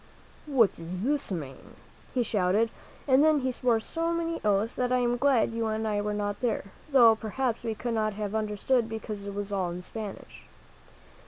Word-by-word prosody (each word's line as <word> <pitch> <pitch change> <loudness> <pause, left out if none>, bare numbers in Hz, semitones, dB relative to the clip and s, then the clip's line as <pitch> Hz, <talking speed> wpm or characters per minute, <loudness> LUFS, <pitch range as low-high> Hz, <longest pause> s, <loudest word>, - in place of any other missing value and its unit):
"What 250 -8 +3
does 175 +3 -6
this 285 -2 0
mean?" 145 -7 -6 0.4
he 250 - +1
shouted, 210 +1 +1 0.4
and 265 +1 +5
then 310 -2 +4
he 260 0 0
swore 240 -2 +1
so 330 +9 -2
many 335 0 -2
oaths 210 +2 +2
that 250 0 -1
I 255 - +4
am 245 -1 +1
glad 245 -3 +3
you 230 0 -1
and 220 0 -1
I 205 -1 0
were 210 0 -2
not 205 0 -2
there, 225 -5 -2 0.2
though 235 -5 +7
perhaps 230 +2 -2
we 225 -2 -2
could 240 +2 -3
not 215 -1 0
have 205 0 -4
understood, 220 +3 0
because 215 -2 -5
it 200 - -5
was 205 0 -4
all 185 -3 0
in 175 +1 -6
Spanish. 210 +1 -8
220 Hz, 190 wpm, -28 LUFS, 205-250 Hz, 0.4 s, though